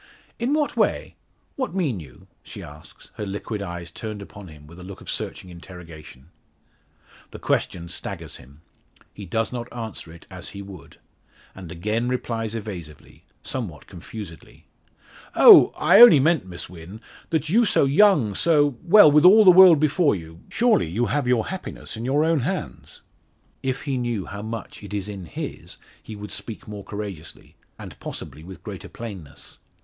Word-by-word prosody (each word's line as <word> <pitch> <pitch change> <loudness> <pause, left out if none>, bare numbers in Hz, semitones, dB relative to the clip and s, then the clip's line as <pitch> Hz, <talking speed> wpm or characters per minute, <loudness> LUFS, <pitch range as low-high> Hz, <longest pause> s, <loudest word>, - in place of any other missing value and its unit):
"In 250 +5 0
what 300 -2 -1
way? - - 0 0.4
What 260 -8 -3
mean 145 - -1
you?" 65 -6 -14 0.2
she - - -10
asks, 75 +1 -14
her 105 - -4
liquid 100 +2 -5
eyes 85 -2 -7
turned 110 -2 -7
upon 100 0 -12
him 75 -2 -14
with 85 +4 -14
a - - -10
look 95 +1 -10
of - - -6
searching 90 - -5
interrogation. 85 -4 -13 1.0
The - - -10
question 85 -1 -2
staggers 85 - -7
him. 70 +5 -18 0.5
He 100 -2 -10
does 115 +6 -2
not 120 -1 -6
answer 110 -8 -7
it 85 - -15
as - - -8
he 100 - -7
would, 95 -3 -13 0.6
and 90 -4 -10
again 105 +8 -2
replies 115 -3 -3
evasively 90 -9 -9 0.2
somewhat 105 - -5
confusedly. 90 -1 -11 0.7
"Oh! - - +9
I - - +6
only 240 -12 +10
meant, 155 - +2
Miss 90 -1 -7
Wynn 90 +4 -11 0.3
that 155 -2 -1
you 225 +7 +4
so 200 - +3
young 140 - +4
so 145 -2 +2
well, 180 -3 +7
with 150 +1 +5
all 210 +4 +8
the 185 - +10
world 180 -3 +8
before 155 - +2
you 80 -2 -10
surely 230 - +2
have 125 +4 0
your 125 -3 +1
happiness 190 -9 -7
in 115 +2 -6
your 145 +4 +2
own 165 -1 +2
hands." 120 - -5 0.6
If 130 0 -3
he 140 -3 -2
knew 120 -5 -3
how 100 +1 -8
much 110 +1 -7
it 105 0 -7
is 100 -1 -3
in 100 -3 -7
his - - -8 0.2
he 110 - -10
would 105 0 -9
speak 115 - -7
more 105 -1 -8
courageously, 100 -7 -8 0.2
and - - -11
possibly 75 +4 -8
with 90 -2 -12
greater - - -8
plainness. 95 -11 -10
105 Hz, 165 wpm, -23 LUFS, 90-140 Hz, 1.0 s, only